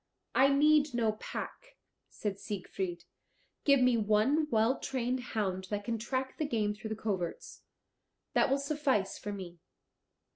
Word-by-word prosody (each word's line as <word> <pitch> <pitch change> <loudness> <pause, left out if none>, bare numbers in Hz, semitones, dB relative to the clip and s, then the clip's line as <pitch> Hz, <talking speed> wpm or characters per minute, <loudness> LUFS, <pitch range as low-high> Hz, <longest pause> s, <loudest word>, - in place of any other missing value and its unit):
"I 270 - +6
need 295 -1 +4
no 225 -2 +2
pack," - - -7 0.3
said 200 -2 -4
Siegfried; 190 -3 -4 0.6
"give 280 -2 +5
me 250 -2 +4
one 220 +9 +3
well 225 +2 +2
trained 255 -1 -1
hound 200 -6 -2
that 205 -1 -2
can 230 +1 -2
track 260 +3 -3
the 310 - 0
game 215 -5 0
through 215 +1 -7
the 220 - -2
coverts. 195 -6 -4 0.7
That - - +4
will 270 - +3
suffice 280 -8 0
for 205 - -5
me." 180 -4 -7
225 Hz, 145 wpm, -32 LUFS, 205-270 Hz, 0.7 s, I